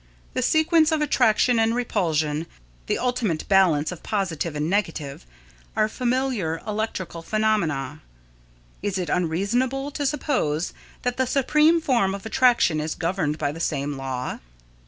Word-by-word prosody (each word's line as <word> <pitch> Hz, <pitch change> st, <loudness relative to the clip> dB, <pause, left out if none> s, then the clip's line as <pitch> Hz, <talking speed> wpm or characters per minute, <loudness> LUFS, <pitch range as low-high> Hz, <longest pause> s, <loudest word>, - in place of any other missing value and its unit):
The 255 Hz, -, -1 dB
sequence 315 Hz, +4 st, +3 dB
of 315 Hz, -, +2 dB
attraction 245 Hz, -4 st, +3 dB
and 225 Hz, +1 st, +2 dB
repulsion, 160 Hz, -9 st, 0 dB, 0.4 s
the -, -, +1 dB
ultimate 245 Hz, -10 st, -1 dB
balance 180 Hz, -6 st, +3 dB
of 180 Hz, -, -8 dB
positive 170 Hz, -6 st, -2 dB
and 150 Hz, +1 st, -1 dB
negative, 165 Hz, -, -2 dB, 0.5 s
are 215 Hz, -, +3 dB
familiar 240 Hz, -8 st, -1 dB
electrical 210 Hz, -5 st, -3 dB
phenomena. 210 Hz, -7 st, 0 dB, 0.8 s
Is 200 Hz, -1 st, -2 dB
it 180 Hz, -4 st, -3 dB
unreasonable 240 Hz, -, 0 dB
to 290 Hz, -1 st, -1 dB
suppose 250 Hz, -, -1 dB, 0.3 s
that 245 Hz, -1 st, -1 dB
the 260 Hz, -1 st, +1 dB
supreme 300 Hz, +5 st, +3 dB
form 235 Hz, -11 st, +1 dB
of 200 Hz, -, -9 dB
attraction 235 Hz, -9 st, +3 dB
is 155 Hz, +1 st, -2 dB
governed 165 Hz, -3 st, -1 dB
by 145 Hz, -2 st, -1 dB
the 160 Hz, -, -8 dB
same 145 Hz, -3 st, -1 dB
law? 130 Hz, -1 st, -4 dB
200 Hz, 135 wpm, -24 LUFS, 160-250 Hz, 0.8 s, sequence